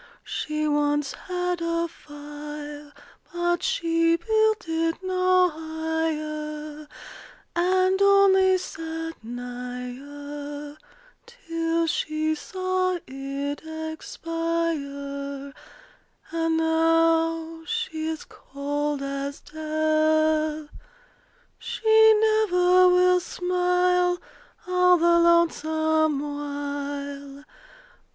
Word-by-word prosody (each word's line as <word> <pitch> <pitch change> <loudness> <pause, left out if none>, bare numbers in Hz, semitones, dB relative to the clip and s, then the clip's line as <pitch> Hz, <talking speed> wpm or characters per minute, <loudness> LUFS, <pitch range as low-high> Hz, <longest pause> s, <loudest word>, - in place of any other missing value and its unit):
She 305 0 -2
once 295 -1 +1
had 360 -1 -3
a 335 0 0
fire; 295 -1 -9 0.4
But 345 0 0
she 330 0 +2
built 435 +1 +1
it 330 0 0
no 370 -1 +3
higher, 310 -1 -4 0.7
And 370 +2 +2
only 385 -1 +5
sat 325 -4 -6
nigher 265 +5 -7 0.5
Till 330 -8 -2
she 310 0 -1
saw 370 +2 -1
it 275 +2 -5 0.3
expire; 280 -5 -4 0.8
And 325 0 0
now 325 0 +2
she 455 -9 -2
is 320 -1 -4
cold 290 +1 -4
as 275 +1 -4
death. 310 0 +1 0.9
She 440 -1 +4
never 370 -4 +4
will 360 0 +5
smile 360 0 +1 0.5
All 360 0 +4
the 340 0 +4
lonesome 315 -3 +2
while. 285 -1 -5
320 Hz, 75 wpm, -25 LUFS, 290-360 Hz, 0.9 s, only